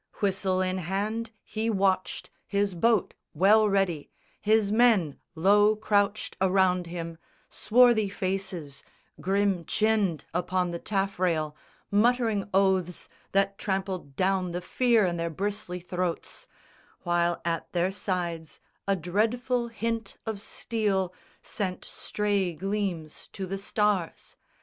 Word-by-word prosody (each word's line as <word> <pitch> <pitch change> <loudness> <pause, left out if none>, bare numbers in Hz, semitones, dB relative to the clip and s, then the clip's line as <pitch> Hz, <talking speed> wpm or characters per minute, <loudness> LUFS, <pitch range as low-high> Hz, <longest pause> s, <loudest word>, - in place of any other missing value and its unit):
Whistle 190 -2 +1
in 185 0 0
hand 205 +6 -2
he 220 +1 -2
watched, 190 -3 0 0.2
his 200 -1 0
boat 215 +4 +2 0.2
well 210 +6 +5
ready, 190 -7 0 0.3
His 215 -1 +3
men 215 - +3 0.2
low 205 +5 +5
crouched 205 -1 0
around 185 -2 +3
him, 170 -1 -6 0.3
swarthy 235 -2 +4
faces 185 -7 -4 0.4
Grim 195 0 +1
chinned 210 -6 +1
upon 180 +1 0
the 170 - -4
taffrail, 180 -7 -1 0.4
muttering 220 -1 +2
oaths 190 -2 +1 0.2
That 195 0 +2
trampled 190 -7 -3
down 185 0 +1
the 175 - -3
fear 235 +2 +3
i' 180 - +1
their 170 -1 -2
bristly 195 +1 -3
throats, 180 -1 -4 0.6
While 175 -1 +1
at 165 -1 -2
their 180 +1 +1
sides 175 -5 -3 0.3
a 195 - +3
dreadful 235 +8 0
hint 230 0 -3
of 220 -3 -4
steel 200 -6 -1 0.3
Sent 185 -3 -4
stray 200 -4 -1
gleams 185 -3 -3
to 195 - -4
the 195 +1 -4
stars. 200 -3 -1
195 Hz, 115 wpm, -27 LUFS, 180-210 Hz, 0.6 s, well